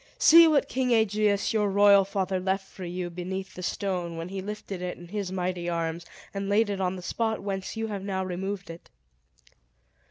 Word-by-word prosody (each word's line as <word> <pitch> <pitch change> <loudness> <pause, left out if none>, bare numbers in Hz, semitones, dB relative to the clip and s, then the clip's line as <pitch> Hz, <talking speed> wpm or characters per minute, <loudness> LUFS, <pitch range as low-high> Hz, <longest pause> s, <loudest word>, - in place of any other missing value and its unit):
See 335 +1 +8
what 300 -4 +3
King 255 -1 -1
Aegeus, 215 -2 +2
your 210 -2 +2
royal 200 0 +6
father, 190 -1 -1
left 190 +1 -1
for 185 - -9
you 175 0 -4
beneath 190 +2 -5
the 180 - -8
stone, 180 -2 -2
when 165 +2 -5
he 195 0 -4
lifted 200 -2 -6
it 180 0 -4
in 175 -1 -12
his 200 -2 -3
mighty 180 -1 -2
arms, 165 0 -3 0.3
and 195 0 -3
laid 205 +1 +3
it 195 -1 -3
on 185 0 0
the 180 - -8
spot 220 +2 -2
whence 195 +1 -4
you 225 - -1
have 205 -3 -4
now 190 -1 -2
removed 190 0 -4
it." 165 - -13
195 Hz, 195 wpm, -27 LUFS, 180-205 Hz, 0.3 s, See